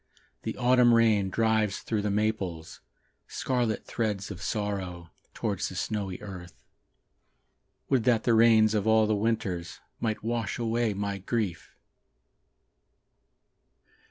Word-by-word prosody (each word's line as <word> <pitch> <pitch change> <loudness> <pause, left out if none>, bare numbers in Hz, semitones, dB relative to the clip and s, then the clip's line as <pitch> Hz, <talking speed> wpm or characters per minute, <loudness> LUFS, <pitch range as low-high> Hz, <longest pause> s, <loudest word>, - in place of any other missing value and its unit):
The - - -5
autumn 125 -1 +5
rain 110 -4 +3
drives 110 -1 +1
through 110 -2 -1
the 105 - -1
maples 100 -6 -2 0.5
Scarlet 120 -4 -1
threads 105 -4 -2
of 95 -1 -8
sorrow, 95 -5 -3 0.2
Towards - - -2
the - - -9
snowy 100 -4 -3
earth. 90 -3 -10 1.2
Would 130 -4 +2
that 115 -3 +3
the 120 - +3
rains 110 -1 +5
of 105 0 0
all 110 0 +5
the 110 - +1
winters 100 -5 -2 0.2
Might 110 -3 -2
wash 115 -1 -2
away 115 -2 0
my 100 0 -3
grief! 100 -4 -3
110 Hz, 120 wpm, -28 LUFS, 100-115 Hz, 1.2 s, autumn